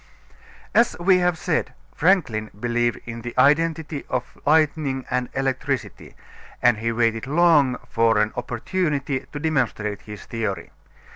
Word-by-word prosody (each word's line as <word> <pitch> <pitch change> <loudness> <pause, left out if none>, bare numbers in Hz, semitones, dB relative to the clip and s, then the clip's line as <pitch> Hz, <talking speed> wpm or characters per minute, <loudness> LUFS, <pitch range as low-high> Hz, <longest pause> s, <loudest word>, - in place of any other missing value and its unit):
As 235 - +3
we 185 +1 +4
have 180 -2 +1
said, 165 -1 -1 0.2
Franklin 145 - +1
believed 120 0 0
in 115 0 -7
the 120 +1 -7
identity 150 +2 +2
of 125 -1 -3
lightning 150 -3 +2
and 125 -1 -1
electricity, 135 -1 -3 0.4
and 120 -4 +3
he 115 +1 -1
waited 115 0 0
long 150 -4 +4
for 115 -1 +2
an 105 0 +1
opportunity 140 +1 -2
to 145 - -5
demonstrate 125 -9 -1
his 105 -1 -10
theory. 105 -7 -4
130 Hz, 130 wpm, -23 LUFS, 115-155 Hz, 0.4 s, we